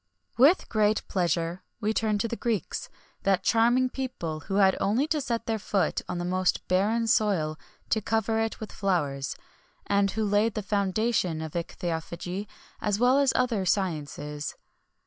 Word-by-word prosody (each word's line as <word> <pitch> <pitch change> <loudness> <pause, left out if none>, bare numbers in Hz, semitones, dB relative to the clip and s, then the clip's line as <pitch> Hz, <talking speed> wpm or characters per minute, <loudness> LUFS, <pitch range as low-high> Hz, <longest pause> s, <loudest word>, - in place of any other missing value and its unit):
With 285 +10 +5
great 215 -1 +1
pleasure 175 -1 0 0.2
we 215 -1 0
turn 215 -1 +1
to 230 - 0
the 235 - -3
Greeks, 225 -7 -2 0.3
that 195 -2 +2
charming 240 +3 +4
people 250 -13 -4
who 195 +6 -5
had 195 -1 +5
only 230 +8 +2
to 310 -3 +1
set 235 -4 -2
their 225 -1 -1
foot 200 -1 0
on 180 - -2
the 175 - -2
most 185 0 0
barren 210 +6 +2
soil 185 -9 +1 0.3
to 220 - +2
cover 220 +1 0
it 225 0 -1
with 220 - -7
flowers, 145 -9 -1 0.5
and 200 0 +2
who 220 +2 -1
laid 205 +2 +2
the 215 - -2
foundation 200 -3 0
of 160 -1 -5
ichthyophagy 175 +3 -4 0.3
as 205 -1 +1
well 250 +4 +4
as 280 -2 +4
all 255 - +3
other 230 -6 -1
sciences. 150 -6 -2
205 Hz, 165 wpm, -27 LUFS, 175-225 Hz, 0.5 s, With